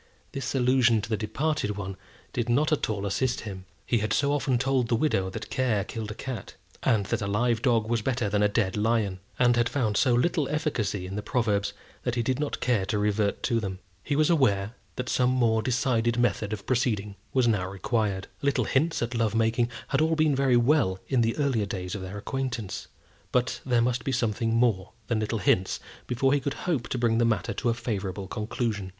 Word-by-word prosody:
This 135 0 -3
allusion 125 -3 +4
to 105 - -5
the 110 - +1
departed 110 +1 -1
one 95 -1 -4 0.4
did 120 -1 -1
not 150 +6 +2
at 155 - +1
all 100 -2 -2
assist 125 +6 0
him. 95 -4 -7 0.2
He 120 - +2
had 110 0 -1
so 140 0 +2
often 135 -3 +1
told 130 -1 +1
the 115 - +2
widow 110 -8 +1
that 110 +4 -7
care 120 -7 +1
killed 110 +1 -5
a 105 - -6
cat, 125 -6 -6 0.3
and 105 -4 +2
that - - -1
a 100 - -2
live 115 +3 +1
dog 115 -4 +2
was 115 -1 0
better 120 -1 0
than 100 0 +1
a 105 - +5
dead 100 -3 0
lion; 105 -3 +1 0.2
and 120 -1 +4
had 120 0 +2
found 120 -6 0
so 125 -1 +4
little 145 +3 +1
efficacy 120 - -1
in 95 +1 -6
the - - -2
proverbs, 105 -2 0 0.3
that 125 -1 -2
he 120 - 0
did 130 +3 0
not 150 -1 -2
care 120 -6 +2
to 105 - 0
revert 105 0 0
to 115 - +2
them. 95 -4 -4 0.3
He 145 - -1
was 155 +3 +3
aware 110 -9 +2 0.2
that 125 0 -4
some 125 -1 +2
more 115 -3 +2
decided 120 0 +1
method 120 -3 +1
of 105 -2 -5
proceeding 110 -6 0 0.2
was 130 -2 +3
now 105 -5 +1
required. 100 0 -1
Little 140 -1 +1
hints 155 +1 +1
at 120 +1 -3
love 115 -2 0
making 115 +1 +2 0.2
had - - +1 0.2
been 155 0 +4
all - - +1
very 130 -2 +3
well 120 -7 +3
in 130 -3 +3
the 115 0 +1
earlier 130 -8 +1
days 90 -2 -4
of 100 - -4
their 95 +2 -6
acquaintance; 120 -2 -4 0.4
but 125 0 0
there 120 -3 +2
must 120 -1 0
be 135 - -1
something 115 -2 0
more 115 -6 +1
than 110 +1 0
little 110 +1 -1
hints 95 -1 +1 0.3
before 135 +3 +2
he 145 - +3
could 140 +1 -3
hope 150 -9 0
to - - -1
bring 115 -1 +2
the - - +4
matter 110 -5 +1
to 120 - -1
a 115 - +1
favourable 100 -4 -3
conclusion. 105 -1 -3
115 Hz, 215 wpm, -27 LUFS, 105-125 Hz, 0.4 s, a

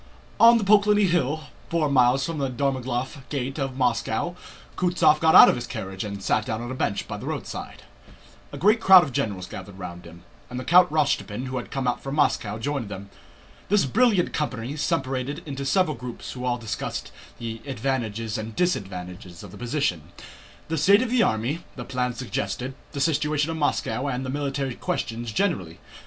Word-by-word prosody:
On 235 +1 +8
the 225 - -1
Poklónny 205 0 +5
Hill, 155 -3 +1 0.3
four 165 -3 +1
miles 130 -1 +3
from 165 -2 -4
the 135 -1 0
Dorogomílov 130 0 -2
gate 135 0 -3
of 135 -2 -3
Moscow, 125 +5 0 0.4
Kutúzov 175 -4 +3
got 160 0 +4
out - - +11
of - - +4
his 120 0 -4
carriage 95 0 -5
and 100 -2 -6
sat 110 - +1
down 110 -1 -2
on 120 +2 -5
a - - -3
bench 100 -6 -2
by - - -5
the - - -8
roadside. - - -6 0.7
A - - -7
great 215 +5 +3
crowd 190 -4 +9
of 140 - -4
generals 100 -6 -2
gathered 95 +1 -9
round 90 -2 -8
him, 85 +1 -13 0.3
and 125 0 -5
Count 180 +3 +6
Rostopchín, 140 -6 0
who 130 0 -4
had 120 - -5
come 135 -2 -2
out 125 - 0
from 135 +1 -4
Moscow, 110 -8 +1
joined 130 -2 -3
them. 100 0 -8 0.6
This 205 -3 +4
brilliant 210 - +2
company 130 -3 -3
separated 145 -1 -2
into 140 -2 -5
several 185 -2 +2
groups 120 0 -7
who 125 -1 -6
all 125 -1 0
discussed 115 -3 -5 0.3
the 115 -1 -6
advantages 115 -4 -2
and 110 0 -6
disadvantages 90 - -3
of 100 - -10
the - - -11
position, 120 - -1 0.6
the 160 -1 -1
state 200 - +5
of 245 - -3
the 250 -2 +3
army, 125 - 0
the 125 - -7
plans 125 -1 -2
suggested, 125 +1 -3 0.2
the 140 - -4
situation 150 +1 +1
of 160 - -4
Moscow, 145 -2 0
and 130 -1 -2
military 140 -2 -2
questions 115 -1 -3
generally. 105 - -1
130 Hz, 180 wpm, -25 LUFS, 115-155 Hz, 0.7 s, out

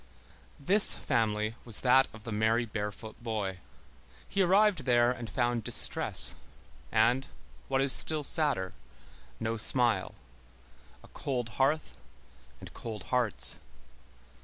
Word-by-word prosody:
This 195 +8 +5
family 110 -4 -2
was 115 -3 +5
that 130 +1 +3
of 110 -1 -15
the 115 - -8
merry 110 +3 0
barefoot 105 +1 -8
boy. 105 -5 -5 0.7
He 200 - -2
arrived 190 -4 +1
there 120 -1 +2
and 120 -3 -8
found 120 -3 -2
distress, - - +2 0.6
and, 120 +5 +1 0.4
what 135 0 -1
is 135 -1 +5
still 155 -2 +4
sadder, 140 - -2 0.7
no 115 +1 -4
smile; 120 +1 0 0.9
a - - -16
cold 125 -4 -5
hearth 135 - -2 0.6
and - - -13
cold 110 -4 -8
hearts. 105 - +5
120 Hz, 115 wpm, -28 LUFS, 110-135 Hz, 0.9 s, This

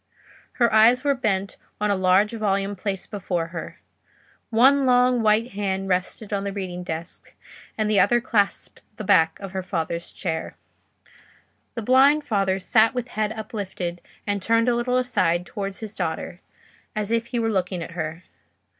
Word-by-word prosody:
Her 235 -3 +2
eyes 230 +4 +5
were 285 -1 +3
bent 200 -7 -2 0.2
on 210 0 +1
a - - +2
large 190 +2 +3
volume 200 -2 -1
placed 195 +1 -4
before 180 -5 -2
her: 165 -1 -7 0.7
one 265 +4 +4
long 250 -1 +4
white 220 +2 +2
hand 195 -1 -2
rested 190 +3 -2
on 200 -1 -1
the 200 - -3
reading 185 -3 -5
desk, 165 -1 -7 0.4
and 215 -1 0
the 210 -2 +3
other 240 - +4
clasped 215 -5 -1 0.2
the - - -5
back 160 -4 +3
of 195 -2 -7
her 190 0 -3
father's 170 -2 -3
chair. 160 -4 -4 1.2
The 230 - -4
blind 275 +6 +5
father 195 -6 0
sat 220 +6 +3
with 245 0 -3
head 215 -1 -1
uplifted 200 -6 -5 0.2
and 205 -1 -1
turned 230 +3 +2
a 245 - +3
little 250 +1 0
aside 205 -9 +1
towards 195 +2 -6
his 215 -2 -6
daughter, 175 0 -4 0.5
as 215 0 -2
if 230 0 0
he 240 - -3
were 225 -1 0
looking 185 -3 -1
at - - -9
her. 165 0 -5
205 Hz, 165 wpm, -24 LUFS, 185-230 Hz, 1.2 s, eyes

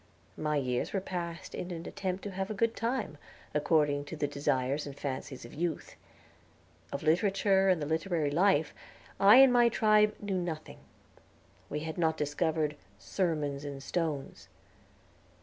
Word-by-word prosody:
My 150 -1 -1
years 125 -3 -1
were 195 - +1
passed 175 -3 -5
in 180 - -5
an 170 -2 -6
attempt 190 0 -4
to 205 - -5
have 190 +1 -3
a 215 - -3
good 230 +2 +1
time, 230 - -2 0.3
according 150 -1 +2
to 155 - -7
the 150 - -1
desires 140 0 -1
and 140 0 -8
fancies 130 -2 -5
of 120 - -12
youth. 165 0 -3 1.0
Of 140 - -4
literature 195 +3 +3
and 180 -3 +3
the 150 - -2
literary 160 -1 0
life, 160 -2 +3 0.5
I 200 +3 +8
and 265 -1 +8
my 240 -1 +5
tribe 215 -1 +3
knew 195 -3 -2
nothing; 160 -3 -6 0.9
we 150 +1 -3
had 160 +2 -5
not 160 -1 +2
discovered 150 0 0 0.2
"sermons 150 - -2
in 140 -1 -6
stones." 150 -1 -3
160 Hz, 150 wpm, -30 LUFS, 145-195 Hz, 1.0 s, I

